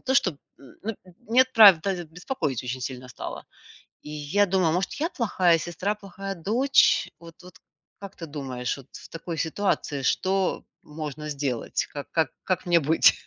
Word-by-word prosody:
то 265 Hz, +1 st, -1 dB
чтоб, 190 Hz, -, +3 dB, 0.2 s
м, 135 Hz, -3 st, -15 dB
ну, 225 Hz, +2 st, -3 dB, 0.3 s
нет, 260 Hz, +2 st, +4 dB
правда, 195 Hz, -5 st, +6 dB
беспокоить 160 Hz, -, -3 dB
очень 125 Hz, +1 st, -4 dB
сильно 130 Hz, 0 st, -6 dB
стало. 125 Hz, -, -7 dB, 0.6 s
И 150 Hz, -, -11 dB
я 150 Hz, +7 st, +1 dB
думаю, 185 Hz, -3 st, +2 dB
может, 180 Hz, +1 st, -1 dB
я 320 Hz, +4 st, -1 dB
плохая 190 Hz, -, +2 dB
сестра, 185 Hz, +6 st, -2 dB
плохая 195 Hz, -1 st, -7 dB
дочь, 235 Hz, +11 st, +3 dB
вот 165 Hz, -1 st, -13 dB
вот, 180 Hz, 0 st, -14 dB, 0.4 s
как 200 Hz, -1 st, -9 dB
ты 165 Hz, -, -7 dB
думаешь? 135 Hz, -4 st, -4 dB
Вот, 135 Hz, -2 st, -13 dB
в -, -, -11 dB
такой 165 Hz, 0 st, -6 dB
ситуации, 160 Hz, -4 st, -1 dB
что 190 Hz, +6 st, +1 dB, 0.2 s
можно 150 Hz, 0 st, -6 dB
сделать? 140 Hz, -5 st, -2 dB
Как 145 Hz, -1 st, -6 dB
как 160 Hz, -6 st, +1 dB
как 185 Hz, -, -1 dB
мне 175 Hz, -1 st, +4 dB
быть? 160 Hz, +2 st, +5 dB
170 Hz, 165 wpm, -26 LUFS, 150-195 Hz, 0.6 s, правда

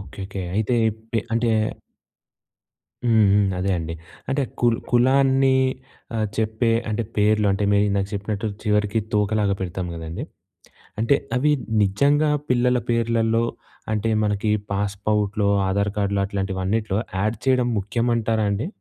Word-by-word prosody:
Okay, 95 Hz, -, -12 dB
okay. 95 Hz, 0 st, -5 dB
అయితే 110 Hz, +3 st, +1 dB
ఈ -, -, +1 dB, 0.2 s
పె 115 Hz, -, +2 dB
అంటే 115 Hz, 0 st, +1 dB, 1.5 s
హ్మ్ 110 Hz, -3 st, +4 dB
హ్మ్. 100 Hz, 0 st, +4 dB
అదే 95 Hz, +2 st, 0 dB
అండి. 80 Hz, -1 st, -4 dB, 0.3 s
అంటే 135 Hz, +1 st, +1 dB, 0.2 s
కుల్ 120 Hz, -1 st, +3 dB
కులాన్ని 135 Hz, +2 st, +4 dB, 0.6 s
ఆహ్, 110 Hz, -1 st, 0 dB
చెప్పే 110 Hz, +1 st, 0 dB, 0.2 s
అంటే 110 Hz, +1 st, -1 dB
పేర్లు 105 Hz, 0 st, +3 dB
అంటే 100 Hz, +1 st, -1 dB
మీరు 100 Hz, 0 st, +4 dB
ఇందాక 100 Hz, -1 st, 0 dB
చెప్పినట్టు 100 Hz, +1 st, -3 dB, 0.2 s
చివరికి 105 Hz, 0 st, +1 dB
తోకలాగా 105 Hz, -1 st, +1 dB
పెడతాం 90 Hz, 0 st, -3 dB
గదండీ. 80 Hz, 0 st, -6 dB, 0.8 s
అంటే 115 Hz, +5 st, +3 dB, 0.2 s
అవి 150 Hz, +4 st, +3 dB, 0.3 s
నిజంగా 140 Hz, +10 st, +3 dB, 0.2 s
పిల్లల 125 Hz, 0 st, +2 dB
పేర్లలో 115 Hz, -1 st, +1 dB, 0.5 s
అంటే 110 Hz, +1 st, 0 dB
మనకి 105 Hz, +1 st, 0 dB, 0.2 s
పాస్‌పౌర్ట్‌లో 100 Hz, +1 st, 0 dB, 0.2 s
ఆధార్ 100 Hz, +2 st, 0 dB
కార్డులో 100 Hz, -1 st, 0 dB
అట్లాంటివన్నిట్లో 95 Hz, +1 st, -2 dB, 0.3 s
ఆడ్ 110 Hz, +2 st, 0 dB
చేయడం 130 Hz, -2 st, +3 dB
ముఖ్యం 110 Hz, +4 st, -1 dB
అంటారా 110 Hz, -1 st, 0 dB
అండి? 100 Hz, +7 st, -1 dB
105 Hz, 130 wpm, -23 LUFS, 100-115 Hz, 1.5 s, హ్మ్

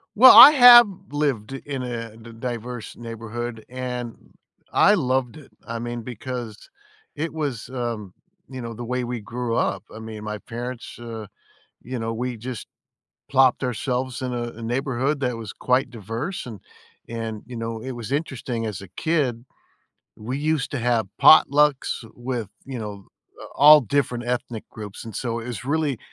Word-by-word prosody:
Well, 255 Hz, +4 st, +10 dB
I 280 Hz, -, +13 dB
have 245 Hz, -5 st, +10 dB, 0.2 s
lived 135 Hz, -6 st, -1 dB
in 135 Hz, -1 st, -5 dB
a 115 Hz, -3 st, -5 dB
di 115 Hz, +1 st, -12 dB
diverse 120 Hz, 0 st, -6 dB
neighborhood 115 Hz, 0 st, -6 dB
and 125 Hz, -2 st, -5 dB, 0.6 s
I 205 Hz, -, +6 dB
loved 130 Hz, -, 0 dB
it, 145 Hz, -, -15 dB
I 115 Hz, 0 st, -5 dB
mean, 120 Hz, 0 st, -4 dB
because 120 Hz, -1 st, -7 dB, 0.5 s
it 160 Hz, +2 st, -3 dB
was, 145 Hz, -8 st, -4 dB
um, 120 Hz, -7 st, -4 dB, 0.4 s
you 130 Hz, -2 st, -7 dB
know, 115 Hz, 0 st, -6 dB
the 120 Hz, -, -7 dB
way 125 Hz, +1 st, -2 dB
we 120 Hz, 0 st, -4 dB
grew 115 Hz, +2 st, -3 dB
up, -, -, 0 dB
I 110 Hz, -, -9 dB
mean, 110 Hz, -1 st, -8 dB
my 105 Hz, 0 st, -4 dB
parents, 120 Hz, +3 st, -7 dB
uh, 115 Hz, -2 st, -7 dB, 0.6 s
you 125 Hz, -1 st, -5 dB
know, 115 Hz, 0 st, -3 dB
we 125 Hz, +1 st, -3 dB
just 120 Hz, 0 st, -7 dB, 0.6 s
plopped 130 Hz, -2 st, +4 dB
ourselves 125 Hz, +1 st, -2 dB
in 125 Hz, -1 st, -3 dB
a 120 Hz, -, -2 dB, 0.2 s
a -, -, -8 dB
neighborhood 135 Hz, +4 st, -1 dB
that 125 Hz, -3 st, -1 dB
was 110 Hz, -3 st, -7 dB
quite 125 Hz, +1 st, +1 dB
diverse, 120 Hz, -, -5 dB
and 110 Hz, -6 st, -8 dB, 0.5 s
and, 115 Hz, -2 st, -5 dB
you 125 Hz, -, -9 dB
know, 115 Hz, -1 st, -4 dB
it 130 Hz, +3 st, -5 dB
was 120 Hz, 0 st, -7 dB
interesting 130 Hz, -6 st, -3 dB
as 105 Hz, -3 st, -5 dB
a 100 Hz, -, -10 dB
kid, 130 Hz, -, -1 dB, 0.7 s
we 125 Hz, +5 st, -4 dB
used 155 Hz, -2 st, 0 dB
to 145 Hz, -, -2 dB
have 120 Hz, -3 st, +1 dB
potlucks 150 Hz, -4 st, +5 dB
with, 120 Hz, -3 st, -4 dB, 0.2 s
you 135 Hz, -2 st, -6 dB
know, 105 Hz, -3 st, -7 dB, 0.4 s
a -, -, -9 dB
all 150 Hz, +2 st, +9 dB
different 125 Hz, -1 st, -1 dB
ethnic 120 Hz, -2 st, -3 dB
groups, 105 Hz, -2 st, -9 dB
and 115 Hz, -2 st, -9 dB
so, 115 Hz, -2 st, -2 dB
it 115 Hz, -, -8 dB
was 120 Hz, -4 st, -6 dB
really 145 Hz, -3 st, 0 dB
120 Hz, 170 wpm, -23 LUFS, 115-130 Hz, 0.7 s, I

